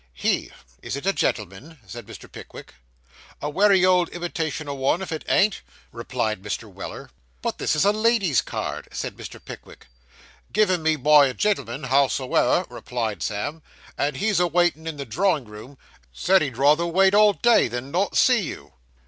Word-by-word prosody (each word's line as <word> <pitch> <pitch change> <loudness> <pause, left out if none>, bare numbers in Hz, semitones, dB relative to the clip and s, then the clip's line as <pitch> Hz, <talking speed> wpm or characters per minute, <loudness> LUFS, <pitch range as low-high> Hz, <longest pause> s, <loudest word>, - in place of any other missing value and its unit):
'He. - - -1 0.3
Is - - -5
it 140 - -7
a 195 - +2
gentleman?' 110 - -3
said 100 +3 -10
Mr. - - -11
Pickwick. - - -12 0.7
'A 150 - -4
wery 195 +2 +4
good 180 -2 +3
imitation 165 -3 -4
o' 140 - -3
one, 135 +5 0
if 185 - -7
it 160 - -4
ain't,' 200 0 +2 0.3
replied 115 -3 -3
Mr. 100 0 -4
Weller. - - -9 0.3
'But - - -3
this - - 0
is 150 - +2
a 205 - +5
lady's 215 - +2
card,' - - -5
said - - -5
Mr. - - -10
Pickwick. - - -12 0.7
'Given 185 -4 +2
me 160 0 +2
by 150 0 +5
a 130 - -5
gen'l'm'n, 140 - -1
howsoever,' 135 0 +2
replied 110 -7 -4
Sam, 110 - -3 0.3
'and 140 -1 -1
he's 210 +3 +1
a 180 - +3
waitin' 170 -1 +1
in 160 -2 -5
the 140 - -5
drawing 160 - 0
room 110 +6 -12 0.3
said 190 - +2
he'd 135 -6 -3
rather 150 +5 +3
wait 190 +3 +3
all 210 0 +6
day, 235 - +3
than 120 +3 -6
not 190 +5 0
see 250 -4 +4
you. 170 - -8
155 Hz, 175 wpm, -23 LUFS, 130-185 Hz, 0.7 s, all